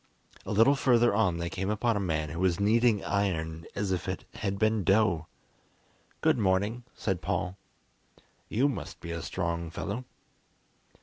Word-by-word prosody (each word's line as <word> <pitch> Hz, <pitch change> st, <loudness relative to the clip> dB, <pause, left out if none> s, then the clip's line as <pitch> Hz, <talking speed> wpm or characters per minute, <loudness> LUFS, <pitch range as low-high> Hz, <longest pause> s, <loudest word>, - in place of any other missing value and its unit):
A -, -, -3 dB
little 115 Hz, +7 st, +5 dB
further 120 Hz, -4 st, +3 dB
on 95 Hz, -5 st, +2 dB
they 85 Hz, 0 st, -2 dB
came 95 Hz, +3 st, -3 dB
upon 110 Hz, +2 st, +1 dB
a -, -, 0 dB
man 80 Hz, -5 st, -1 dB
who 85 Hz, +3 st, -5 dB
was 95 Hz, 0 st, +2 dB
kneading 110 Hz, +1 st, +3 dB
iron 80 Hz, -5 st, -1 dB
as 100 Hz, -2 st, -1 dB
if 90 Hz, -3 st, -2 dB
it -, -, -4 dB
had 100 Hz, -1 st, -2 dB
been 110 Hz, 0 st, +2 dB
dough. 95 Hz, -5 st, +3 dB, 0.9 s
"Good -, -, +3 dB
morning," 105 Hz, +4 st, +1 dB
said 95 Hz, -2 st, -2 dB
Paul, 90 Hz, +1 st, -2 dB, 0.9 s
"you 130 Hz, +6 st, +2 dB
must 140 Hz, -, -5 dB
be 85 Hz, -, -7 dB
a 85 Hz, 0 st, -3 dB
strong 85 Hz, -2 st, -2 dB
fellow." 105 Hz, +9 st, -4 dB
100 Hz, 160 wpm, -29 LUFS, 85-110 Hz, 0.9 s, little